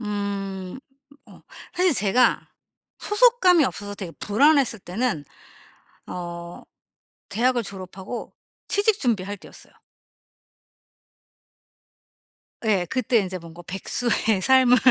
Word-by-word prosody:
음. 200 -1 -4 0.5
어 - - -16 0.3
사실 360 -1 +3
제가 235 +3 +2 0.5
소속감이 415 - +4
없어서 205 -5 -4
되게 190 -4 -7
불안했을 270 +1 +3
때는 185 - -2 0.8
어 170 -1 -7 0.7
대학을 240 +3 +1
졸업하고 190 +3 -7 0.3
취직 410 +1 +2
준비할 205 -5 -1
때였어요. - - -15 2.9
예 200 -5 +2
그때 250 0 +1
인제 190 -3 -2
뭔가 170 0 -12
백수의 215 +2 0
삶을 260 0 +5
210 Hz, 200 characters per minute, -24 LUFS, 190-255 Hz, 2.9 s, 삶을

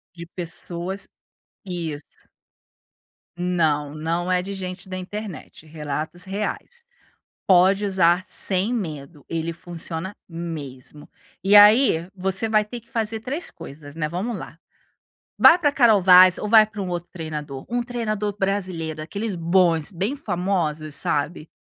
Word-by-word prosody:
De 170 -1 -8
pessoas, 175 +2 -1 0.6
isso. 165 -6 -5 1.1
Não, 160 -5 0
não 165 +3 -2
é 180 0 +2
de 195 +2 -6
gente 185 -1 -5
da 185 - -4
internet, 190 -3 -8
relatos 155 +2 -4
reais. 210 - -4 0.6
Pode 190 +2 +5
usar 180 -2 +3
sem 195 +4 0
medo, 150 - -5
ele 165 0 -2
funciona 170 +2 -6
mesmo. 150 -5 -7 0.3
E 195 +2 +4
aí, 205 -5 +6
você 190 +3 -1
vai 215 -1 +3
ter 240 +3 -7
que 230 - -28
fazer 225 -3 -2
3 275 +9 -5
coisas, 145 0 -11
né, 155 -2 -2
vamos 200 +7 -3
lá. 165 - -9 0.8
Vai 335 - +8
para 300 -5 +2
Carol 235 -7 +5
Vaz 180 0 +8
ou 210 - -3
vai 215 0 +7
para 210 -1 -8
um 185 - -4
outro 175 0 -4
treinador, 150 -5 -6
um 240 +1 -1
treinador 215 -4 -3
brasileiro, 180 -6 -2
aqueles 200 +6 -4
bons, 170 -1 +2
bem 200 +10 -2
famosos 170 - -2
sabe? 150 +3 -1
180 Hz, 135 wpm, -23 LUFS, 160-205 Hz, 1.1 s, Vai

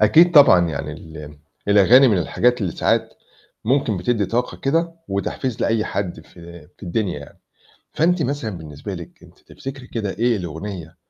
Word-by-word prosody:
أكيد 165 +12 +5
طبعًا 90 - +7
يعني 75 -1 -4
ال 75 -2 -11 0.3
الأغاني 110 +7 +6
من 105 -5 +2
الحاجات 120 +8 +1
اللي 95 -5 -2
ساعات - - +1 0.6
ممكن 125 -2 +1
بتدي 105 +3 0
طاقة 120 +4 -2
كده، 165 +5 0 0.2
وتحفيز 105 +5 -3
لأي 115 -1 +1
حد 90 -7 -4
في 85 -1 -14
في - - -26
الدنيا 95 -2 -2
يعني، 70 - -14 0.5
فأنتِ 175 +2 +2
مثلًا 140 -5 -2
بالنسبة 75 +4 -8
لِك 85 -2 -11
أنتِ - - -18
تفتكري 135 -1 -9
كده 110 -5 -3
إيه 115 +3 +1
الأغنية 85 -1 -7
105 Hz, 155 wpm, -21 LUFS, 85-125 Hz, 0.6 s, طبعًا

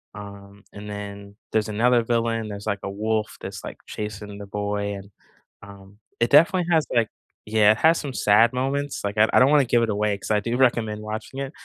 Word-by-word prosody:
um, 100 -1 -11
and 105 +1 -9
then 100 0 -8 0.2
there's 110 0 0
another 120 +3 +3
villain, 115 -1 -1
there's, 100 0 -7
like, 100 -2 -1
a 100 - -3
wolf 110 +1 -2
that's, - - -7
like, - - -8
chasing 105 -1 -7
the 100 - -9
boy, 100 0 -3
and, 100 +1 -11 0.5
um. 100 0 -14 0.2
It 115 - +2
definitely 170 +4 +5
has, 160 -2 +3
like 115 -2 +3 0.4
Yeah, 105 -1 +4
it - - -8
has 165 +1 +5
some 140 -3 -5
sad 110 +2 +4
moments, 140 +2 -2
like, 100 +1 -3
I 110 +1 +5
I - - +5
don't 130 +2 +5
wanna 145 -3 +5
give 120 0 +2
it 115 - 0
away 105 0 0
'cause - - -9
I 105 - +3
do 120 +4 -2
recommend 115 -4 +1
watching 110 +5 -6
it 135 0 -4
105 Hz, 210 wpm, -23 LUFS, 100-120 Hz, 0.5 s, definitely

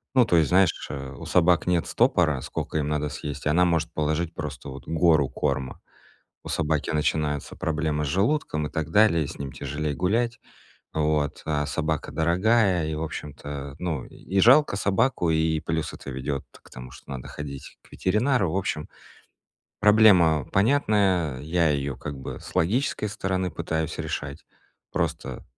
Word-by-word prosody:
Ну, 125 -2 +6
то 85 - +3
есть, 80 -3 +3
знаешь, 90 -2 +2 0.3
у - - -8
собак 90 0 +3
нет 90 -2 +2
стопора, 75 -6 +2
сколько 80 - -4
им 75 -1 0
надо 75 0 -1
съесть, 75 -1 -6
она 85 +4 +4
может 85 -2 0
положить 80 +2 -1
просто 70 -1 -6
вот 65 +1 -10
гору 80 -4 +3
корма. 65 -1 -2 0.6
У - - -8
собаки 80 -2 0
начинаются 75 -1 -1
проблемы 75 -1 -1
с - - -3
желудком 95 - 0
и - - -11
так 80 -1 -3
далее, 85 -7 +4
с - - -9
ним 70 -2 -5
тяжелее 75 +1 -3
гулять. 115 +8 0 0.5
Вот, 75 -2 0
а 75 -1 0
собака 80 0 -2
дорогая, 90 +1 +2
и, 80 - -2
в 75 - -3
общем-то, 70 -2 -6
ну, 80 -6 -3
и 95 +3 -3
жалко 130 +4 +6
собаку, 100 -2 +1
и 80 0 +2
плюс 80 0 -3
это - - -9
ведёт 65 +1 -3 0.2
к - - -18
тому, 65 0 -9
что 70 - -13
надо 65 -2 -6
ходить 70 -2 -8
к - - -23
ветеринару. 105 - +1
В - - -3
общем, 85 -5 -2 0.9
проблема 100 - +6
понятная, 100 - +2
я 80 +2 +1
её 70 -2 -1
как 70 +3 -6
бы 65 - -7
с - - -11
логической 105 +4 +1
стороны 95 -3 -2
пытаюсь 80 -2 -3
решать. 70 +2 -5 0.5
Просто: - - -3
80 Hz, 160 wpm, -25 LUFS, 75-95 Hz, 0.9 s, Ну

